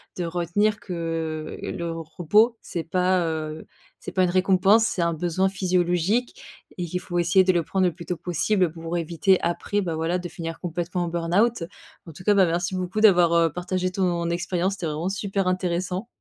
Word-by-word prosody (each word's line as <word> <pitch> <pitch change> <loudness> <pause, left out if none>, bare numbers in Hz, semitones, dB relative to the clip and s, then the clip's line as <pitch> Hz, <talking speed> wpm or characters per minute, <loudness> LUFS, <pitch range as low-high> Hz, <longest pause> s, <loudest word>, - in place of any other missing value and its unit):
de 175 - -3
retenir 180 +5 0
que 165 -3 -4
le 170 -1 -4
repos, 175 +8 +2
c'est 170 -2 -5
pas, 180 0 +1
heu, 155 -1 -4 0.3
c'est - - -7
pas 185 - +2
une 180 - +2
récompense, 190 +4 +4
c'est 180 - -1
un 170 0 +1
besoin 180 +3 0
physiologique 185 +4 0 0.4
et 175 - -2
qu'il 180 +2 -3
faut 175 -1 -5
essayer 180 +2 +4
de 185 - +3
le 170 -2 +1
prendre 185 +3 +1
le - - 0
plus 170 - -10
tôt 180 - -2
possible 180 +1 0
pour 165 +1 -6
éviter 175 +3 +2
après, 190 +4 -1
bah, 170 -4 -2
voilà, 165 +3 -1
de 175 -1 -6
finir 165 -1 -6
complètement 175 +1 -3
en - - -4
burn-out. 175 +5 +1 0.4
En 165 - -10
tout 185 - -12
cas, 205 +1 +4
bah, 190 -2 +6
merci 175 +2 -1
beaucoup 185 +4 -2
d'avoir, 175 -5 +6
heu, 165 -2 +3
partagé 185 +1 -2
ton 175 -3 0
expérience, 180 +2 -1
c'était 180 - -5
vraiment 160 +4 -2
super 195 -1 -2
intéressant. 185 +3 -1
175 Hz, 195 wpm, -24 LUFS, 170-185 Hz, 0.4 s, bah